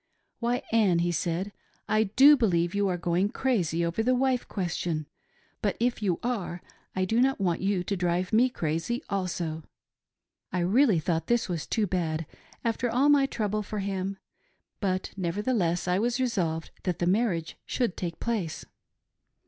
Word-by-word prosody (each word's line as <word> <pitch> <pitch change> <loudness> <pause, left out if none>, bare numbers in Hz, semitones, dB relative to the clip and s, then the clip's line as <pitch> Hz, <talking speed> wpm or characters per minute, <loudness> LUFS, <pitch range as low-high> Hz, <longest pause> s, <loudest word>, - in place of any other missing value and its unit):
' - - -49
Why, 240 +1 0
Ann,' 210 -6 +4
he 175 +1 +1
said, 175 +4 -1 0.2
' - - -38
I - - +2
do 270 +9 +7
believe 175 -9 +1
you 200 0 +1
are 180 -2 0
going 175 +3 +1
crazy 180 -11 0
over 170 +6 -1
the 255 +3 +2
wife 255 -1 +1
question; 175 -4 -2 0.6
but - - 0
if 240 0 0
you 185 -5 0
are 200 -8 -3 0.3
I 185 0 +1
do 225 +5 +2
not 270 -1 +2
want 175 -4 0
you 195 -2 +1
to 200 - -2
drive 180 +2 -1
me 245 +4 +5
crazy 170 - -2
also. 175 -4 -2 0.9
I 180 - 0
rea:lly 210 +3 +4
thought 165 +1 -1
this 240 -1 +2
was 170 -7 -3
too 220 - +1
bad, 165 -4 -1 0.4
after 235 +1 0
all 260 +5 +3
my 280 -2 +5
trouble 215 -4 -1
for 210 +1 -5
him; 195 -1 -2 0.6
but 185 -3 -1
nev 175 -3 -2
ertheless 200 -6 0
I 180 +1 +2
was 240 +3 0
resolved 180 -11 -1
that 180 -3 -1
the 175 - 0
marriage 180 -4 +1
should 240 -8 0
take 170 -2 -4
place. 205 -9 -2
195 Hz, 175 wpm, -28 LUFS, 175-235 Hz, 0.9 s, do